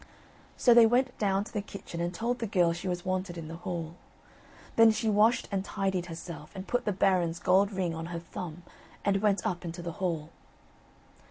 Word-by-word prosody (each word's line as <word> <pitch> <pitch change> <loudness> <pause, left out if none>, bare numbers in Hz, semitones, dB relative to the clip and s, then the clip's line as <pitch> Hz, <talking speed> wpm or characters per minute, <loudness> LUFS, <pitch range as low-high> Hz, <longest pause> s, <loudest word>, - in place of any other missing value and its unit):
So 245 - +6
they 230 -1 +8
went 250 +2 +2
down 195 -1 +2
to 210 - -12
the 210 - -1
kitchen 195 -4 -7
and 170 0 -1
told 235 +7 -2
the 230 - -2
girl 175 -4 +3
she 175 +2 -6
was 175 -1 -3
wanted 185 -1 -2
in 165 -2 -6
the 165 +1 -7
hall. 170 -1 -5 0.8
Then 225 0 +8
she 220 +1 0
washed 215 +3 +3
and 195 -1 0
tidied 190 -3 -2
herself 165 -2 -8
and 190 0 -7
put 245 - 0
the 210 - +1
Baron's 180 -3 +2
gold 195 +3 +3
ring 185 -4 -1
on 165 0 -5
her 170 -1 -4
thumb 170 0 -7 0.4
and 195 -1 +2
went 205 -2 +2
up 175 -1 -2
into 170 0 -6
the 170 - -3
hall. 165 -4 -2
185 Hz, 200 wpm, -29 LUFS, 170-205 Hz, 0.8 s, they